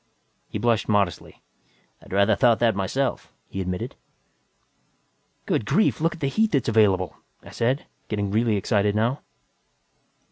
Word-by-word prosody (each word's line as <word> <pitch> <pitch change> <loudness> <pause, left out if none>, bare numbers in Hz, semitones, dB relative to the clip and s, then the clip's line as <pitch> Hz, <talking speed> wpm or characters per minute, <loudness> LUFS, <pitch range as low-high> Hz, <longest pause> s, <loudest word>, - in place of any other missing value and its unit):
He - - -4
blushed 115 -3 +1
modestly. 100 -5 -1 0.6
"I'd - - -16
rather 100 +3 +3
thought 120 -2 +4
that 115 -2 +3
myself," 115 +8 -2 0.2
he 95 - -5
admitted. 90 -1 -4 1.5
"Good 105 - -1
Lord, 215 -6 +2
look 165 +1 +1
at 170 - -15
the - - 0
heat 220 +9 +1
that's 140 - +1
available!" 100 -5 +2 0.3
I - - -12
said, 125 +5 0 0.2
getting 100 -2 -2
really 110 +1 +2
excited 100 0 +1
now. 120 +6 0
110 Hz, 140 wpm, -24 LUFS, 100-130 Hz, 1.5 s, thought